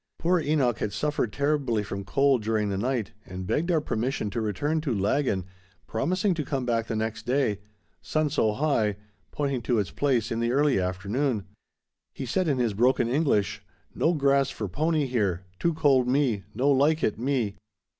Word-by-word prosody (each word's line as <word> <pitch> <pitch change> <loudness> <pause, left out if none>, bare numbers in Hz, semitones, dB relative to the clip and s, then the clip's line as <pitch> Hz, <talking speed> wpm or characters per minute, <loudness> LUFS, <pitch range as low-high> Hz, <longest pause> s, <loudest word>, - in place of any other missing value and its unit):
Poor 180 +2 +2
Enoch 140 -7 +1
had 105 - -2
suffered 145 -2 -1
terribly 140 -6 0
from 100 0 -5
cold 135 +5 +2
during 110 -1 0
the 100 - -2
night, 120 -2 -1
and 90 0 -7
begged 150 - 0
our 165 -3 +3
permission 120 -5 -2
to 115 - -2
return 145 +10 -1
to 140 -7 -1
Laggan, 100 -1 0 0.4
promising 185 - 0
to 160 -3 -2
come 135 -3 -2
back 115 -2 0
the 115 - -2
next 110 +1 -3
day—"sun 105 - -2
so 110 -7 +2
high," 115 -6 +1 0.3
pointing 140 -4 -2
to 120 +1 0
its 100 -5 -1
place 125 -5 0
in 115 - -1
the 115 0 +1
early 145 -5 +3
afternoon. 100 +6 -1 0.7
He 135 - -4
said 180 +9 0
in 140 -4 +1
his 120 -4 +1
broken 120 +3 +3
English: 120 -7 +1 0.3
"No 165 - +2
grass 140 -2 +3
for 110 -5 -4
pony 155 - 0
here, 100 -8 0 0.2
too 170 -2 +1
cold 135 -5 +3
me; 125 -6 +1
no 135 +5 +3
like 145 +4 +3
it 110 - 0
me." 120 -6 -1
125 Hz, 175 wpm, -26 LUFS, 105-145 Hz, 0.7 s, our